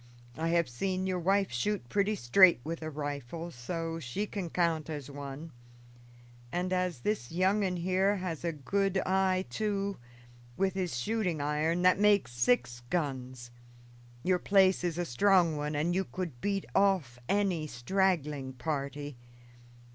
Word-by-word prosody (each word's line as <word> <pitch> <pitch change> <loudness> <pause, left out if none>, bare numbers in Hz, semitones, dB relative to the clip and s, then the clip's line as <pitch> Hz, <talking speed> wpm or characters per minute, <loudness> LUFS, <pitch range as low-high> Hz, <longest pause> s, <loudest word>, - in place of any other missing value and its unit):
I 160 +1 -2
have 170 0 +2
seen 185 +10 -2
your 185 -1 -1
wife 195 +1 +2
shoot 175 +5 -1
pretty 205 - +1
straight 180 +2 +6
with 165 +2 -5
a 155 - -4
rifle, 145 +2 -5
so 165 +6 -4
she 160 +9 -3
can 195 -4 -5
count 165 -3 0
as 145 -3 -5
one, 140 +3 -7 1.0
and 180 +1 -1
as 180 -7 -1
this 205 - -2
young 190 +4 +2
un, 185 -2 -1
here, 185 +3 +2
has 180 -5 -4
a 170 - 0
good 195 +6 0
idea, 190 0 +2
too, 200 -1 -2 0.6
with 190 -1 +1
his 180 -9 -2
shooting 185 - -1
iron, 155 +4 0
that 185 +1 +5
makes 205 -10 +4
six 120 0 +1
guns. 130 -6 -3 0.7
Your 185 -1 +2
place 190 -1 +4
is 175 -2 -1
a 175 - -1
strong 170 +4 +3
one, 150 0 -3
and 160 +4 +1
you 190 +2 +1
could 170 -11 -6
beat 200 -1 -1
off 185 -12 +2
any 190 -6 +1
straggling 150 -2 0
party. 140 +1 -4
170 Hz, 150 wpm, -31 LUFS, 145-190 Hz, 1.0 s, straight